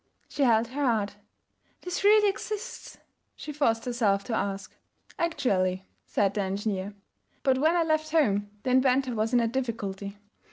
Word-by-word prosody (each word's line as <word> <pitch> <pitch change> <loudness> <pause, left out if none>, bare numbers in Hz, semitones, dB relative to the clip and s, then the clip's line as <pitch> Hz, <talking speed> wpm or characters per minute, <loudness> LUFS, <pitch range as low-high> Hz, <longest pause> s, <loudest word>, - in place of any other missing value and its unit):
She - - -4
held 230 -3 +3
her 285 +3 -3
heart. 215 -5 0 0.6
'This 360 +1 -4
really 420 +1 +6
exists?' 425 +3 -5 0.4
she 300 - -7
forced 230 -6 +1
herself 220 -5 +1
to 235 - -5
ask. 195 -2 -3 0.4
'Actually,' 190 - 0 0.2
said 200 -1 +1
the 205 - -1
engineer. 195 0 -3 0.5
'But 265 -2 +3
when 315 +4 +3
I 340 - +3
left 310 -1 0
home 205 -11 +2
the 255 - 0
inventor 260 0 +3
was 220 0 -1
in 245 - +4
a 230 - +2
difficulty. 210 -5 -4
235 Hz, 155 wpm, -27 LUFS, 200-290 Hz, 0.6 s, really